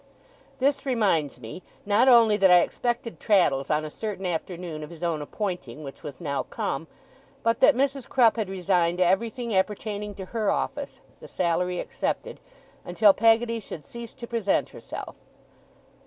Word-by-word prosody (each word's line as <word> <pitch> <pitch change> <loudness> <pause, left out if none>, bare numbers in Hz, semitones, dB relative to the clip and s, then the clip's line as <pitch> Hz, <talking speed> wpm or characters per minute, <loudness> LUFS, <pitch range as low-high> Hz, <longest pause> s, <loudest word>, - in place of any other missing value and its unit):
This 275 +1 +1
reminds 195 - +1
me, 115 +9 -9 0.2
not 210 +5 +3
only 230 -4 +7
that 195 -2 +4
I 180 -1 +8
expected 240 +3 -3
Traddles 175 -10 +2
on 155 0 +1
a 155 - -6
certain 205 -1 -5
afternoon 170 -2 -4
of 150 - -8
his 170 0 -11
own 165 -3 -1
appointing, 155 - -5
which 135 -1 -9
was 145 -4 -8
now 140 -4 -2
come, 135 +4 -4 0.6
but 230 0 +1
that - - +6
Mrs. 275 0 -1
Crupp 235 -4 +4
had 220 -4 -2
resigned 180 -2 +1
everything 225 +6 +1
appertaining 205 +1 -2
to 190 - -7
her 220 -3 0
office - - -3 0.2
(the - - -11
salary 180 0 0
excepted) - - -3 0.4
until 200 +3 +4
Peggotty 230 +2 +3
should 160 -8 -8
cease 235 -1 -9
to 245 - -8
present 230 -4 0
herself. - - -8
195 Hz, 155 wpm, -26 LUFS, 170-230 Hz, 0.6 s, I